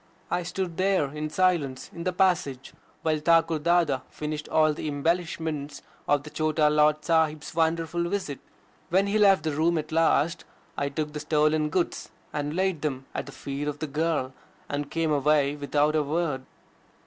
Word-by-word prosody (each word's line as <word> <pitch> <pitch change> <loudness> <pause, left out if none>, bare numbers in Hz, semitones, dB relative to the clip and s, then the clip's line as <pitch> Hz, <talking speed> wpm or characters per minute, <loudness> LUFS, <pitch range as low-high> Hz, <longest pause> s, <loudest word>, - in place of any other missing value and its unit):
I 180 - +1
stood 180 0 -4
there 185 -7 +1
in 155 0 -3
silence 155 -6 0
in 170 +1 -7
the 185 - +1
passage, 175 -8 0 0.3
while 155 -1 +1
Thakur 165 0 +3
Dada 170 -3 +2
finished 150 0 -5
all 155 0 +4
his - - -10
embellishments 160 -1 -2 0.2
of 145 -1 +2
the 150 - -10
Chota 155 -1 +2
Lord 150 0 +3
Sahib's 160 -1 +1
wonderful 165 +1 0
visit. 185 -8 -3 0.5
When 190 +3 +3
he 205 +2 +1
left 195 -5 +5
the 160 - 0
room 160 +3 +1
at 155 +1 -4
last, 165 +1 +2 0.3
I 140 - -1
took 150 +1 -3
the 150 - -4
stolen 150 0 +2
goods 175 +2 -1 0.2
and 150 +1 -2
laid 185 -4 0
them 135 -3 -3
at - - -4
the - - -8
feet 140 +1 -5
of 145 -1 -2
the 155 - -3
girl 150 -3 -1 0.3
and 145 0 -3
came 165 -1 0
away 145 0 +2
without 145 +1 +1
a 155 - +3
word. 145 -3 -2
155 Hz, 170 wpm, -26 LUFS, 150-170 Hz, 0.5 s, left